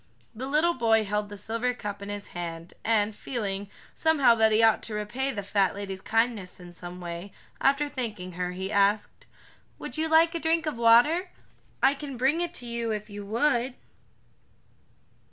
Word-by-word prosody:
The 250 +4 -5
little 310 +5 +3
boy 225 -4 +3
held 210 +1 -2
the 205 - -8
silver 230 +5 -2
cup 205 -3 -6
in 200 - -7
his 205 0 -6
hand, 170 -1 -6
and 220 -1 +2
feeling, 200 -6 -4 0.2
somehow, 315 -6 +4
that 220 -1 +3
he 220 +1 +4
ought 225 -1 +5
to 215 - -2
repay 235 +6 -2
the 215 -7 -3
fat 195 -1 +1
lady's 195 -2 -5
kindness 225 -5 0
in 175 -1 -11
some 175 +1 -8
way, 175 +2 -6 0.3
after 280 +2 +3
thanking 215 -10 -5
her, 180 +1 -3
he 190 +2 -4
asked: 205 +1 +1 0.5
"Would - - -7
you 320 - +1
like 325 +1 +5
a 335 - -2
drink 325 0 +1
of 300 -6 -3
water? 245 +11 +5 0.5
I 270 - +6
can 280 -2 -7
bring 270 +7 +2
it 345 0 -3
to 245 - -2
you 235 -1 -2
if 210 0 -4
you 205 0 -7
would." 245 +2 +1
225 Hz, 180 wpm, -27 LUFS, 200-265 Hz, 0.5 s, I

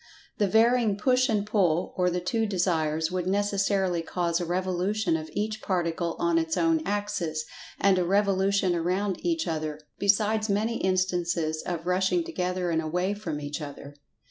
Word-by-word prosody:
The 205 - +3
varying 225 0 +3
"push 255 +4 +2
and 210 -2 +1
pull" 185 -6 +1
or 180 -1 +2
the 180 0 -1
two 220 +5 -1
Desires, 160 -4 0
would 180 -1 -2
necessarily 195 -2 +1
cause 170 0 -1
a 175 - -3
revolution 185 +1 0
of 155 -1 -4
each 215 +1 -2
Particle 170 -2 -1
on 340 -1 +2
its 325 -1 -1
own 330 -1 +2
axis, 175 -6 -2 0.3
and 195 -2 +4
a - - +2
revolution 195 0 +2
around 185 +3 -1
each 335 -2 0
other—besides 200 +8 0
many 220 +3 0
instances 175 -4 0
of 170 -2 -3
rushing 190 - +1
together 180 - -2
and 160 -1 +1
away 180 +5 -1
from 170 -8 -4
each 145 +1 -5
other. 145 -1 -8
185 Hz, 155 wpm, -27 LUFS, 170-205 Hz, 0.3 s, and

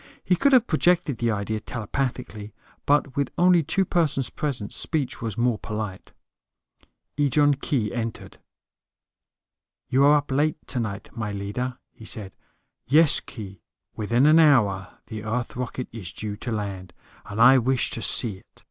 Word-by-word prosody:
He 180 - +2
could 280 +10 +3
have 250 -3 +6
projected 165 - +1
the 120 - +1
idea 105 0 -2
telepathically; 115 -2 -4 0.3
but 140 -1 +2
with 140 -1 0
only 180 -1 +5
two 160 +6 0
persons 150 -8 0
present, 125 -9 -4
speech 150 -6 -3
was 115 -3 -4
more 120 -2 +1
polite. 105 -3 -6 1.1
Ejon 145 +1 +4
Khee 110 -8 -1
entered. 115 -1 -5 1.5
"You 135 +2 +3
are 150 +1 +6
up 145 -1 -4
late 150 +3 +1
tonight, 110 -6 -4
my 110 -3 -3
leader," 105 +6 -4
he 115 - -14
said. 105 -3 -4 0.6
"Yes, 155 +3 +5
Khee. 100 -5 -10 0.3
Within 115 +5 +1
an 155 +2 +6
hour 105 -12 +3
the 110 -2 -7
Earth 115 +2 -3
rocket 125 0 -4
is 100 -6 -6
due 105 +1 -5
to 120 +3 -6
land, 100 -4 -5 0.3
and 105 - -6
I 130 +3 +7
wish 130 +1 +1
to 115 - -4
see 110 -5 +3
it. - - -27
120 Hz, 150 wpm, -24 LUFS, 105-145 Hz, 1.5 s, I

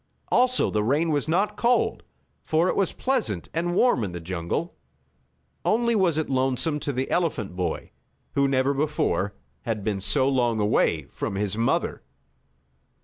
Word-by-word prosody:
Also 255 0 +3
the 105 - +1
rain 150 +8 +1
was 145 -1 0
not 200 +6 +1
cold, 240 +2 +1 0.4
for 160 +3 +2
it - - 0
was 195 -3 +1
pleasant 235 - -1
and 175 +2 -1
warm 240 - +3
in 95 -4 -4
the 85 - -5
jungle. 85 - -3 0.9
Only 235 +1 +2
it - - +2
was 175 -6 +2
lonesome 135 +1 0
to 145 -1 -2
the 130 0 -3
elephant 145 - -1
boy, 90 -1 -3 0.4
who, 140 0 +3
never 135 +1 +2
before, 140 -9 0 0.3
had 110 -4 -3
been 105 -2 -1
so 130 +7 +2
long 120 -4 +1
away 105 0 +2
from 100 - -5
his 100 0 -1
mother. 115 +1 0
140 Hz, 155 wpm, -25 LUFS, 105-170 Hz, 0.9 s, Also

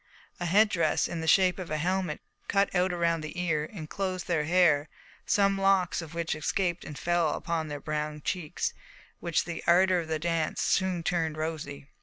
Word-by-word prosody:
A 175 - -2
head 210 +6 +5
dress, 165 -5 +1
in 170 -1 -4
the 160 - -4
shape 185 +2 +4
of 180 - -6
a 155 - -1
helmet 180 0 -1 0.3
cut 200 0 +2
out 180 0 +2
around 170 -2 +1
the 155 +3 -6
ear, 160 -4 0
enclosed 185 +2 -4
their 160 -4 +1
hair, 160 -3 +3 0.4
some 195 -1 +3
locks 195 -3 +3
of 165 0 -9
which 170 -1 -1
escaped 175 +3 -1
and 150 - -8
fell 175 -3 +1
upon 165 -2 -2
their 145 -1 -5
brown 150 0 -3
cheeks, 175 -5 -2 0.5
which 170 -3 0
the 170 -1 -5
ardour 185 +1 +5
of 165 - -5
the 160 0 -1
dance 165 0 -1
soon 185 -3 +1
turned 165 -3 -1
rosy. 155 -3 -4
170 Hz, 185 wpm, -28 LUFS, 155-185 Hz, 0.5 s, head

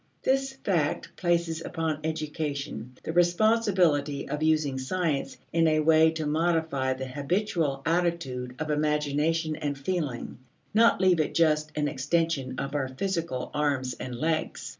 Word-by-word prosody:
This 270 0 +1
fact 165 -8 0
places 170 -2 0
upon 160 -2 -2
education 150 -5 -4
the 160 - -4
responsibility 175 -6 +2
of 150 +2 -3
using 155 -4 +2
science 155 0 -1 0.2
in 165 0 +4
a 155 0 +3
way 160 +1 +5
to 160 -1 -3
modify 160 -4 +1
the 130 0 -5
habitual 145 +1 -1
attitude 165 -8 -1
of 155 -1 -3
imagination 150 +2 0
and 145 -2 -3
feeling, 140 -7 -3 0.3
not 230 +2 +5
leave 185 -3 +4
it 155 - 0
just 155 -2 +2
an 150 -1 0
extension 145 -2 -1
of 140 +1 -3
our 140 -3 0
physical 165 -2 -3
arms 140 -4 0
and 125 0 -6
legs. 155 +5 -2
155 Hz, 140 wpm, -27 LUFS, 140-170 Hz, 0.3 s, way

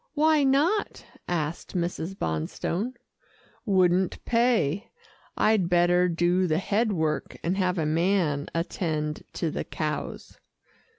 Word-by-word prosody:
"Why 305 0 +4
not?" 300 +10 +1 0.2
asked 165 -1 -3
Mrs. 175 +1 -3
Bonstone. 170 - -2 0.7
"Wouldn't 185 -2 +2
pay 230 - +1 0.5
I'd 215 -5 +3
better 175 +1 +4
do 175 +2 +2
the 155 -1 +1
head 210 +4 +1
work, 160 -5 -2
and 175 +3 0
have 185 -1 +1
a 160 - 0
man 160 -2 +1
attend 155 -3 -2
to 165 -3 -2
the - - -3
cows." 155 -1 -5
180 Hz, 115 wpm, -26 LUFS, 160-205 Hz, 0.7 s, Why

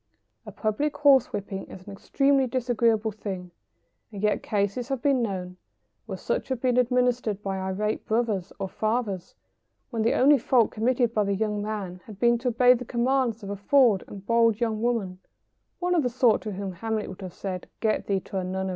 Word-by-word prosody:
A - - -6
public 280 +8 -1
horse 280 -4 +5
whipping 195 -1 -5
is 185 -1 -12
an 200 - -9
extremely 275 +6 +2
disagreeable 230 -3 +1
thing, 190 -4 -6 0.6
and 205 -1 -7
yet 210 0 +2
cases 205 +4 -1
have 270 -2 -1
been 270 0 +2
known 185 -5 -4 0.5
when 190 -3 -5
such - - -2
have 260 -2 -1
been 250 0 +1
administered 245 -4 +1
by 195 -1 -2
irate 190 +3 -2
brothers 215 -5 0
or 195 - -3
fathers, 215 -2 -2 0.6
when 230 -2 -2
the 225 - +2
only 280 +2 +5
fault 235 -1 +3
committed 240 +1 +1
by 215 - +2
the 200 0 0
young 210 0 -1
man 200 -4 -5
had 210 -3 -11
been 235 -1 +3
to 250 - -3
obey 245 +1 +5
the 250 0 -3
commands 240 -1 0
of 200 - -5
a - - -3
forward 220 0 +3
and 200 -1 -10
bold 230 -1 +3
young 225 -3 -1
woman 220 -6 -1 0.6
one 360 0 0
of 340 - +3
the 250 - 0
sort 240 -2 +3
to 215 - -5
whom 195 0 -4
Hamlet 220 +3 -3
would 190 +1 -9
have 185 -2 -8
said, 185 -2 -5
"Get 220 -1 0
thee 195 -2 0
to 190 - -4
a - - -3
nunnery." 190 +1 -3
220 Hz, 200 wpm, -26 LUFS, 200-245 Hz, 0.6 s, horse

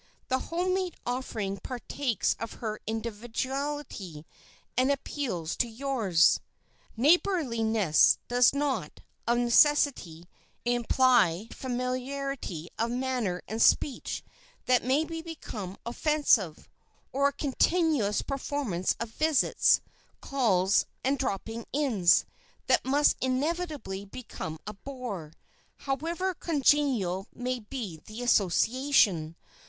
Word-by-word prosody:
The 260 - +2
home 360 +2 0
made 370 -2 -1
offering 220 -6 -3
partakes 250 0 -2
of 230 - -5
her 215 -2 -5
individuality, 230 - -4 0.5
and 255 +3 +3
appeals 240 - -3
to 240 - +1
yours. 225 -8 +2 0.6
Neighborliness 230 - +3
does 245 0 +5
not, 270 - -2 0.3
of 235 0 +3
necessity, 240 - +3 0.4
imply 240 -5 +3
familiarity 255 - -4
of 230 +1 +1
manner 245 -7 -2
and 220 +2 -3
speech 275 - +2 0.4
that 250 -1 +3
may 265 +5 +2
become 320 - -7
offensive, 240 - +1 0.4
or 280 +2 +2
a - - 0
continuous 290 - +1
performance 270 -9 -2
of 235 - -3
visits, 310 +1 +3 0.4
calls 205 -8 +2 0.2
and 275 +1 +1
"droppings 225 -1 -3
in" 255 -11 -1 0.6
that - - +3
must 285 +3 +3
inevitably 270 - -2
become 195 -7 -7
a 210 - -5
bore, 205 - -7 0.4
however 330 +7 -2
congenial 275 - +1
may 250 0 -2
be 210 - -6
the 220 +3 -6
association. 210 - +2
245 Hz, 100 wpm, -28 LUFS, 205-280 Hz, 0.6 s, does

